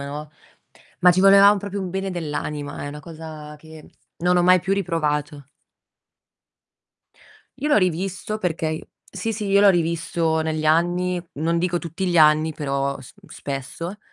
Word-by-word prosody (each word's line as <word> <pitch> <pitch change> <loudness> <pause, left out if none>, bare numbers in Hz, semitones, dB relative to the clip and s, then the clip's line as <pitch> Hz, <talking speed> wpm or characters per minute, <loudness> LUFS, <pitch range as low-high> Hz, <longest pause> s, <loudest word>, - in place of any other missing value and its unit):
no, 145 +2 -6 0.7
ma 180 0 +7
ci 185 - +1
volevam 200 +1 +7
proprio 200 0 -5
un 185 -2 -4
bene 195 +1 -3
dell'anima, 150 -4 -5
è - - -4
una 145 +1 -8
cosa 155 -1 -10
che 160 0 -14 0.3
non 180 +1 +2
ho 175 - +3
mai 185 +1 +6
più 190 +3 -1
riprovato. 150 -6 -2 2.1
Io 290 - -2
l'ho 295 - +4
rivisto 190 +3 -1
perché 165 -5 -2
i 155 0 -4 0.3
sì, 200 +3 -3
sì, 210 -1 -4
io 200 0 +4
l'ho 200 - +7
rivisto 165 -1 0
negli 155 -1 -2
anni, 175 +3 +1 0.2
non 165 +2 0
dico 175 0 0
tutti 170 +3 -5
gli 175 - 0
anni, 155 +1 +5
però 140 -2 -2
s 130 - -13
spesso. 145 +8 -6
165 Hz, 155 wpm, -22 LUFS, 150-185 Hz, 2.1 s, ma